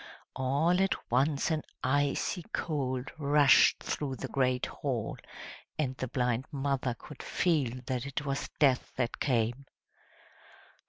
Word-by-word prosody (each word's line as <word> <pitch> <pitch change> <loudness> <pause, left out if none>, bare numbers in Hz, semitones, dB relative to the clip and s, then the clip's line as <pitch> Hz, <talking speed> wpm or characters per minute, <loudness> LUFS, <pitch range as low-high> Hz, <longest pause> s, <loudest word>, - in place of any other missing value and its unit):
All 145 +8 +2
at 195 -9 -1
once 140 +5 +2
an 155 -1 +1 0.2
icy 145 +6 +1
cold 130 -5 -2
rushed 145 -1 +5
through 140 -3 -2
the - - -5
great 130 -2 +1
hall, 125 -7 -3 0.6
and 130 -4 -1
the 130 - -3
blind 125 0 0
mother 135 -3 -1
could 150 - -11
feel 135 -8 0
that 130 +1 -2
it 140 +2 -4
was 140 0 -2
Death 135 -4 +3
that 125 -2 -2
came. 120 +1 0
135 Hz, 125 wpm, -30 LUFS, 125-145 Hz, 0.6 s, rushed